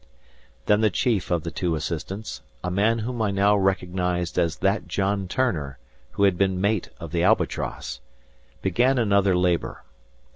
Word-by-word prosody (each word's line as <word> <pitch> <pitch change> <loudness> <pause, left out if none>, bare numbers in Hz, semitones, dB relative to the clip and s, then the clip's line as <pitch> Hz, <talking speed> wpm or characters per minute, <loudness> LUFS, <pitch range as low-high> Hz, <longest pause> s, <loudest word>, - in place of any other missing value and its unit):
Then 105 +1 +3
the 110 - +4
chief 105 0 0
of 85 -3 0
the 85 - -4
two 85 -3 -1
assistants, 85 +7 -5 0.2
a 90 - -2
man 105 +5 +2
whom 120 -1 -3
I 110 - +2
now 100 +1 +3
recognized 90 -3 0
as 85 -3 +1
that - - 0
John 100 0 -1
Turner 85 - -1 0.4
who 100 - 0
had 95 -3 +3
been 95 -2 +2
mate 100 0 0
of 85 -3 -8
the 85 - 0
"Albatross," 90 - 0 0.6
began 120 +8 +2
another 100 -5 +3
labor. 90 -2 0
95 Hz, 155 wpm, -24 LUFS, 90-105 Hz, 0.6 s, the